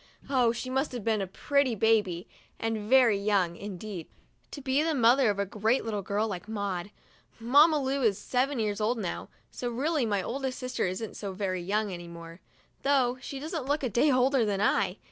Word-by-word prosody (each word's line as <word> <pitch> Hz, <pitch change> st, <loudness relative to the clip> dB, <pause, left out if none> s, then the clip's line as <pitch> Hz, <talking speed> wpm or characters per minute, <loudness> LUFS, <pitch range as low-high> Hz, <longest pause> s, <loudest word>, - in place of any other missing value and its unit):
Oh, 250 Hz, -4 st, +4 dB
she 235 Hz, +2 st, -5 dB
must 265 Hz, +2 st, -1 dB
have 240 Hz, -4 st, -5 dB
been 220 Hz, -1 st, +1 dB
a 195 Hz, -, -2 dB
pretty 280 Hz, +5 st, +1 dB
baby, 205 Hz, -5 st, +1 dB, 0.3 s
and 220 Hz, -2 st, -3 dB
very 245 Hz, -6 st, +5 dB
young, 200 Hz, -4 st, +1 dB
indeed, 195 Hz, -2 st, -7 dB, 0.4 s
to -, -, -8 dB
be 270 Hz, +1 st, +1 dB
the 320 Hz, 0 st, 0 dB
mother 245 Hz, 0 st, +5 dB
of 205 Hz, -, 0 dB
a 200 Hz, -, 0 dB
great 215 Hz, +5 st, 0 dB, 0.2 s
girl 205 Hz, +3 st, 0 dB
like 200 Hz, 0 st, -6 dB
Maud! 200 Hz, -4 st, -3 dB, 0.5 s
Mamma 290 Hz, +7 st, +5 dB
Lu 270 Hz, 0 st, -1 dB
is 215 Hz, -6 st, +2 dB
seven 260 Hz, +5 st, 0 dB
years 215 Hz, -2 st, -1 dB
old 230 Hz, +3 st, +1 dB
now, 190 Hz, -6 st, -4 dB, 0.2 s
so 245 Hz, -, -4 dB
really 275 Hz, +2 st, 0 dB
my 200 Hz, -3 st, 0 dB
oldest 265 Hz, +3 st, -3 dB
sister 255 Hz, -5 st, -2 dB
isn't 190 Hz, +4 st, -5 dB
so 200 Hz, -2 st, -5 dB
very 185 Hz, -2 st, -2 dB
young 205 Hz, +2 st, -1 dB
any 175 Hz, -1 st, -7 dB
more, 170 Hz, 0 st, -10 dB, 0.4 s
though 260 Hz, -3 st, +2 dB
she 275 Hz, -, -6 dB
doesn't 310 Hz, -2 st, -4 dB
look 290 Hz, +1 st, 0 dB
a 255 Hz, -, 0 dB
day 245 Hz, +8 st, +3 dB
older 255 Hz, 0 st, +3 dB
than 205 Hz, -2 st, 0 dB
I. 205 Hz, -, +1 dB
225 Hz, 195 wpm, -28 LUFS, 200-265 Hz, 0.5 s, very